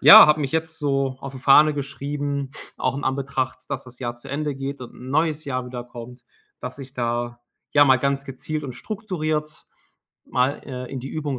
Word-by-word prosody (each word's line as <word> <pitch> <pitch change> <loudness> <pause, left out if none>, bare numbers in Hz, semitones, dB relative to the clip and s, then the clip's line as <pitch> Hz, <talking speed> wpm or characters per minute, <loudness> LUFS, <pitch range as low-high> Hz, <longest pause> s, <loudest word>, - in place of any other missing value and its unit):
ja, 220 +1 +12
habe 150 0 +4
mich 135 -2 -2
jetzt 160 0 -1
so 135 -3 0
auf 135 - -6
die - - -6
Fahne 150 +3 +7
geschrieben, 140 0 -3 0.3
auch 130 +1 0
in 140 - -4
Anbetracht, 130 -1 -2
dass 135 -1 -2
das 125 -1 -14
Jahr 120 -1 -2
zu 120 - -12
Ende 145 0 -1
geht 135 0 -4
und 125 - -9
'n 130 +1 -9
neues 155 +1 +1
Jahr 130 -2 -2
wieder 125 -1 -5
kommt, 125 0 -10 0.4
dass 125 +2 -6
ich 135 0 -10
da, 120 -1 -2 0.3
ja, 145 0 +7
mal 130 -2 +6
ganz 140 +1 0
gezielt 150 +4 -4
und 130 -3 -5
strukturiert 155 -8 -3 0.6
mal, 130 +3 +2
äh, 125 -2 -5
in 135 - -3
die 135 - -6
Übung 145 -4 -3
135 Hz, 200 wpm, -24 LUFS, 130-150 Hz, 0.6 s, ja